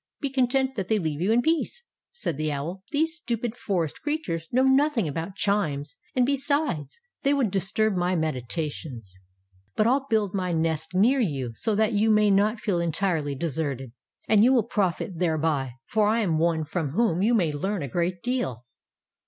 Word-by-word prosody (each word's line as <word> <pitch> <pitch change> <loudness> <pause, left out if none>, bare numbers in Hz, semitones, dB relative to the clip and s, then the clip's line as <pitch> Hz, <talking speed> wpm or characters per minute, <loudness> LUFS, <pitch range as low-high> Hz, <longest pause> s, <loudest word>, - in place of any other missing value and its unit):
'' - - -66
Be 280 -3 -2
content 265 0 +1
that 195 -7 -3
they 220 - +2
leave 160 -5 -2
you 195 +5 +2
in 240 +2 +3
peace/" 330 +9 0 0.3
said 480 - -4
the 155 +1 -1
Owl. 160 +7 -4
''These 310 +2 +2
stupid 235 -7 -3
forest 175 -10 -2
crea 295 +1 0
tures 165 - -5
know 255 +2 +3
nothing 265 - +3
about 165 +6 -4
chimes, 165 -9 -1 0.2
and 250 -1 +4
be 280 +2 +2
sides, 280 - -1 0.2
they 280 +1 +2
would 250 -8 +1
disturb 200 +2 +1
my 180 +1 +1
meditations. 130 - -4 0.6
But 215 - +2
I 235 - +4
"11 270 +1 +1
build 215 -4 +1
my 185 -3 -1
nest 160 +1 -1
near 240 +9 +4
you, 140 - -1
so 215 - -1
that 220 +2 +2
you 215 +2 +2
may 210 -1 +4
not 210 +3 +2
feel 200 -5 0
entirely 165 -4 0
deserted. 140 -4 -3 0.4
And 210 -1 +5
you 250 - +6
will 240 -4 +4
profit 185 -3 -1
thereby, 155 -6 0
for 215 -1 +2
I 225 +2 +2
am 165 -7 +1
one 165 -1 +1
from 155 -3 -3
whom 195 -4 +2
you 230 +4 +3
may 175 -8 +2
learn 190 +4 -2
a - - -3
great 175 +5 -2
deal."" 130 - -2
190 Hz, 195 wpm, -26 LUFS, 160-235 Hz, 0.6 s, you